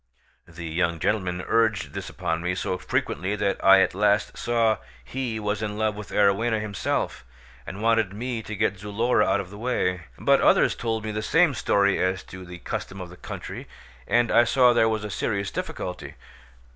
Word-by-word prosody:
The 85 0 -9
young 85 +1 0
gentleman 90 -1 -1
urged 110 -4 +1
this - - -5
upon 80 0 -2
me 90 +1 -1
so 90 - -2
frequently 95 +4 -1
that 100 -1 -1
I 95 0 +8
at - - +2
last 105 +1 +1
saw 115 -2 +1 0.3
he 115 - -3
was 105 0 -2
in 105 -1 -3
love 110 -1 +1
with 105 0 -8
Arowhena 105 +3 +2
himself, 100 - -2 0.4
and 100 +3 -6
wanted 115 -4 +2
me 115 +3 -4
to 110 0 -6
get 100 -2 0
Zulora 105 +5 +1
out - - +2
of 95 -1 -6
the 100 - -10
way; 90 -8 -1
but - - +3
others - - +4
told 115 -2 -2
me 110 - -2
the 105 0 -3
same 165 +7 +3
story 100 -4 +2
as 95 0 0
to 95 0 -10
the 90 0 -9
custom 95 +2 -5
of 90 -1 -7
the - - -11
country, - - -8 0.4
and 120 -1 +2
I 120 - +6
saw 125 +1 +4
there 115 -1 +4
was 110 -1 -2
a 105 - -5
serious 100 +1 -2
difficulty. 90 -1 -5
105 Hz, 190 wpm, -25 LUFS, 95-110 Hz, 0.4 s, I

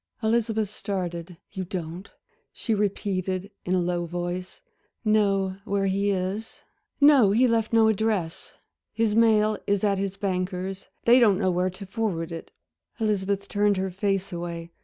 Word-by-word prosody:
Elizabeth 220 -2 +1
started. 180 -4 -4
"You 190 -2 -4
don't," 175 +1 -6 0.4
she 225 - -2
repeated, 195 -2 -1
in 185 - +1
a - - +3
low 175 -1 -1
voice, 175 +1 -4 0.5
"know 195 -3 +2
where 200 -1 0
he 200 +1 +1
is?" 195 +3 -3 0.4
"No, 280 -7 +7
he 235 +6 +4
left 230 -2 +1
no 225 -1 +5
address. 210 -6 -1 0.4
His 225 -2 +1
mail 215 -2 +4
is 200 0 +1
at 200 -2 +2
his 195 0 -3
banker's 185 0 -3 0.2
they 240 +2 +7
don't 210 -6 +5
know 190 -2 +1
where 180 +1 +1
to 185 +2 -9
forward 190 -5 -2
it." 165 - -7 0.5
Elizabeth 200 -2 0
turned 205 -1 +2
her 190 0 -1
face 195 0 -1
away. 170 -1 -5
195 Hz, 150 wpm, -26 LUFS, 185-215 Hz, 0.5 s, No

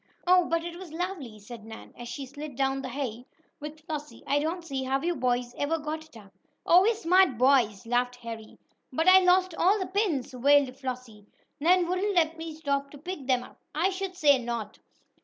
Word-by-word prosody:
"Oh, 360 0 +5
but 335 0 0
it 345 0 -7
was 370 -4 -10
lovely!" 325 - -5
said 220 +2 -11
Nan, 220 0 -11
as 240 0 -8
she 275 +1 -5
slid 285 +1 -9
down 270 +1 0
the 260 - -5
hay 250 -2 -5 0.3
with 300 +1 -8
Flossie. 300 -2 -6
"I 285 - +2
don't 330 +3 -3
see 270 -4 -3
how 265 +1 0
you 345 +4 -1
boys 245 -2 -1
ever 305 +3 0
got 310 +1 -5
it 310 -7 -16
up." 200 -3 -16 0.3
"Oh, 355 +2 +7
we're 445 +4 +3
smart 365 - +3
boys!" 245 -5 +3
laughed 245 +1 0
Harry. 230 -2 -9 0.3
"But 320 +6 0
I 375 0 +9
lost 370 0 +3
all 375 +5 +3
the 380 - -2
pins!" 370 - -1
wailed 275 0 +4
Flossie. 250 -6 -7 0.3
"Nan 350 +3 +3
wouldn't 375 +3 -1
let 330 -2 +3
me 325 0 -6
stop 280 -2 -2
to 290 - -12
pick 305 -3 -7
them 255 -2 +2
up!" - - -16
"I 350 +5 +2
should 380 -1 -4
say 290 -6 +4
not! 235 -3 -5
290 Hz, 205 wpm, -28 LUFS, 250-345 Hz, 0.3 s, I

